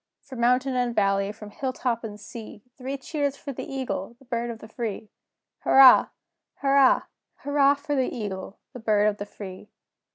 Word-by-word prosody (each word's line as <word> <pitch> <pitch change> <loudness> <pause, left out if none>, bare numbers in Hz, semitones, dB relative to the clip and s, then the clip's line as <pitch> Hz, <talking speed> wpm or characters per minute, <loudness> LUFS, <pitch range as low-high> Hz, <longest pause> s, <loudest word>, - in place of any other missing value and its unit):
From 260 - -9
mountain 250 +2 +2
and 245 -1 0
valley, 195 0 +2
from 210 -1 -11
hill 260 +3 -3
top 240 -3 -2
and 210 -2 -7
sea, 210 0 -10
Three 270 +1 -5
cheers 285 0 -2
for 280 -1 -7
the - - -7
Eagle, 255 -5 -4
the 270 - -21
Bird 240 -1 -2
of 230 - -5
the 220 - -12
Free! 220 -2 -5 0.5
Hurrah! 265 -1 +7 0.5
Hurrah! 275 -1 +4 0.4
Hurrah 285 0 +4
for 285 +1 -4
the 260 -2 0
Eagle, 200 -3 -5 0.2
the 250 - -8
Bird 215 -2 +2
of 210 -1 0
the 205 - -6
Free! 195 0 -10
240 Hz, 180 wpm, -25 LUFS, 210-270 Hz, 0.5 s, Hurrah